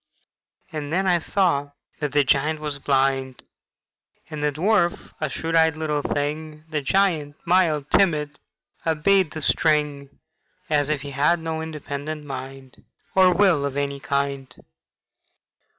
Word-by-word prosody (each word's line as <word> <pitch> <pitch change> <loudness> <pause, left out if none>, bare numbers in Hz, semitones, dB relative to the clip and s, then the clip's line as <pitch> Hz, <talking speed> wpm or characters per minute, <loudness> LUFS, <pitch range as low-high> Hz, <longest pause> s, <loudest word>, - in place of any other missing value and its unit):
And 150 -2 -5
then 190 +3 +1
I 180 -2 +3
saw 155 -6 0 0.3
that 150 -2 -2
the 145 0 +3
giant 150 +3 +1
was 150 -2 -5
blind, 135 -1 0 0.9
And 150 -1 -4
the 150 - +2
dwarf 175 +3 +1
a - - 0
shrewd 165 0 -4
eyed 160 -1 +4
little 150 -2 -1
thing; 150 +2 -3
The 150 -1 -1
giant, 155 -3 +1
mild, 170 -5 +3
timid, 150 -6 +2 0.4
obeyed 165 +3 +2
the 155 -2 -5
string 150 -3 +1 0.6
As 145 -1 +2
if 150 -3 0
he 140 0 -7
had 150 +6 +2
no 160 -1 -3
independent 150 -1 -6
mind, 135 -1 -8 0.3
Or 185 -1 +6
will 180 -5 +3
of 140 -1 -3
any 140 -1 -2
kind. 140 -1 -2
150 Hz, 135 wpm, -23 LUFS, 140-165 Hz, 0.9 s, Or